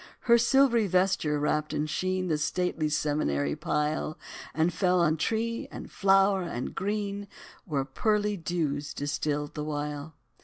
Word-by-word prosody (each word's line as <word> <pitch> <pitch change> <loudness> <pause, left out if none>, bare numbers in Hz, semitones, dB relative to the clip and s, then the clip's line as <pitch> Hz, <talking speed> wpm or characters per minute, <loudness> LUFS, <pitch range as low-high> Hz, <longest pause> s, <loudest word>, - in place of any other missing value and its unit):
Her 235 -1 +5
silvery 240 -2 +4
vesture 180 -5 +2
wrapped 150 +1 0
in 150 - 0
sheen 185 +4 -1
The 155 -3 0
stately 155 0 0
seminary 75 - 0
pile, 150 +1 -1 0.3
And 160 +2 +1
fell 180 -1 +2
on 160 -2 +3
tree, 230 +7 -1
and - - -8
flower, 195 0 +4
and 130 -8 -4
green, 205 0 -2 0.4
Where 140 -6 -1
pearly 210 +8 0
dews 155 -5 -2
distilled 145 0 -2
the 150 - -4
while. 150 0 -4
160 Hz, 140 wpm, -28 LUFS, 150-195 Hz, 0.4 s, Her